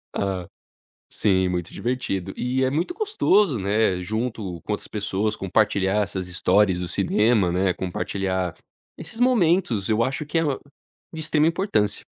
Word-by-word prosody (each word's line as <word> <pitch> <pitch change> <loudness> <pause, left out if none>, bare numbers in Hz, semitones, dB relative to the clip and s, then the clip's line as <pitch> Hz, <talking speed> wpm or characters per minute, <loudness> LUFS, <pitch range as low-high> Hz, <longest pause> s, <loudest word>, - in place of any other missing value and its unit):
Hã, 95 -3 -2 0.6
sim, 95 -2 +2
muito 90 -1 -3
divertido 100 -7 -2
e 130 +2 0
é - - +2
muito 160 - -1
gostoso, 210 - +2
né, 100 -1 +1
junto 105 -3 -3
com 105 - -2
outras - - -5
pessoas, 105 0 -1
compartilhar 100 +1 +1
essas 95 -2 -4
histórias 90 +1 +2
do 90 - -3
cinema, 100 0 +2
né, 90 +1 +1
compartilhar 95 0 -2 0.4
esses 225 - -7
momentos, 175 - +2
eu 110 +1 +3
acho 135 +4 -2
que 160 +3 -2
é 165 - +3 0.7
de 160 - -6
extrema 155 0 +2
importância. 165 - 0
105 Hz, 145 wpm, -24 LUFS, 95-130 Hz, 0.7 s, eu